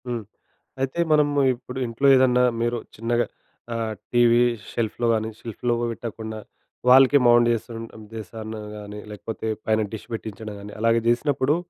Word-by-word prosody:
హ్మ్. 120 Hz, -2 st, -3 dB, 0.6 s
అయితే 135 Hz, +5 st, -2 dB
మనము 145 Hz, -1 st, +3 dB, 0.2 s
ఇప్పుడు 125 Hz, +1 st, -8 dB
ఇంట్లో 115 Hz, +4 st, +1 dB
ఏదన్నా 125 Hz, -1 st, +4 dB, 0.2 s
మీరు 120 Hz, +1 st, 0 dB, 0.2 s
చిన్నగా 120 Hz, +2 st, +1 dB, 0.5 s
ఆహ్, 115 Hz, -1 st, -2 dB, 0.2 s
టీవీ 120 Hz, 0 st, +5 dB, 0.3 s
షెల్ఫ్‌లో 115 Hz, +1 st, -1 dB
కాని, 110 Hz, 0 st, -1 dB
షెల్ఫ్‌లో 120 Hz, +1 st, -2 dB
కుడా 120 Hz, 0 st, -1 dB
పెట్టకుండా 110 Hz, -1 st, -6 dB, 0.5 s
వాల్‌కే 135 Hz, +2 st, +7 dB
మౌంట్ 120 Hz, 0 st, +6 dB
చేసుంటే 115 Hz, 0 st, -6 dB
ఉద్దెశం 110 Hz, 0 st, -8 dB, 0.3 s
కానీ, 105 Hz, 0 st, -8 dB
లేకపోతే 110 Hz, +2 st, -6 dB, 0.2 s
పైన 110 Hz, 0 st, +2 dB
డిష్ 110 Hz, -, -7 dB
పెట్టించడం 110 Hz, -1 st, -6 dB
కానీ, 105 Hz, +1 st, -9 dB
అలాగ 115 Hz, +1 st, +3 dB
చేసినప్పుడు. 135 Hz, +3 st, +2 dB
115 Hz, 140 wpm, -24 LUFS, 110-125 Hz, 0.6 s, వాల్‌కే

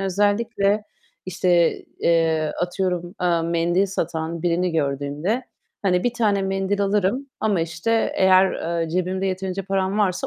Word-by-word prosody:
özellikle, 205 Hz, +1 st, +1 dB, 0.4 s
işte, 175 Hz, -2 st, +2 dB, 0.2 s
eee, 160 Hz, -2 st, +2 dB
atıyorum, 180 Hz, 0 st, -2 dB
eee, 175 Hz, -2 st, +2 dB
mendil 170 Hz, +3 st, +1 dB
satan 165 Hz, -3 st, -3 dB
birini 175 Hz, 0 st, +1 dB
gördüğümde, 150 Hz, -, -1 dB, 0.4 s
hani, 180 Hz, -3 st, +1 dB
1 245 Hz, -, +1 dB
tane 210 Hz, -4 st, +1 dB
mendil 195 Hz, +1 st, -1 dB
alırım 205 Hz, +6 st, 0 dB
ama, 205 Hz, -5 st, +1 dB
işte, 165 Hz, +8 st, 0 dB
eğer, 190 Hz, 0 st, +5 dB, 0.3 s
eee, 165 Hz, -, -3 dB
cebimde 185 Hz, +2 st, -1 dB
yeterince 190 Hz, 0 st, -3 dB
param 195 Hz, +1 st, -1 dB
varsa 185 Hz, -4 st, +1 dB
185 Hz, 130 wpm, -22 LUFS, 170-200 Hz, 0.4 s, eğer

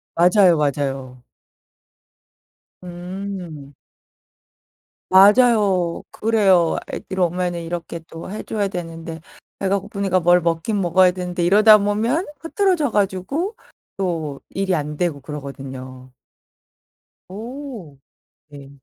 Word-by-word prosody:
맞아요, 180 Hz, +1 st, +5 dB
맞아요. 135 Hz, -3 st, -2 dB, 1.6 s
음. 175 Hz, -4 st, -7 dB, 1.4 s
맞아요. 200 Hz, -3 st, +4 dB
그래요. 195 Hz, -7 st, +2 dB, 0.2 s
'애들이 190 Hz, -1 st, -5 dB
오면은 175 Hz, -1 st, -1 dB
이렇게 170 Hz, 0 st, -5 dB
또 165 Hz, +2 st, -9 dB
해 210 Hz, -, -6 dB
줘야 210 Hz, -2 st, -2 dB
되는데. 165 Hz, -3 st, -7 dB, 0.4 s
배가 195 Hz, +1 st, 0 dB
고프니까 200 Hz, -2 st, -1 dB
뭘 175 Hz, +1 st, +4 dB
먹긴 170 Hz, +5 st, -1 dB
먹어야 180 Hz, +1 st, +4 dB
되는데.' 180 Hz, -1 st, -4 dB
이러다 210 Hz, +4 st, +7 dB
보면 220 Hz, -, 0 dB
흐트러져 335 Hz, -, +1 dB
가지고 205 Hz, -, -1 dB, 0.4 s
또 160 Hz, -7 st, -3 dB
일이 195 Hz, -1 st, -1 dB
안 150 Hz, -1 st, -4 dB
되고 170 Hz, -5 st, -1 dB
그러거든요. 135 Hz, -2 st, -9 dB, 1.2 s
오. 225 Hz, -, -8 dB, 0.5 s
네. 140 Hz, -2 st, -12 dB
180 Hz, 220 characters per minute, -21 LUFS, 165-205 Hz, 1.6 s, 이러다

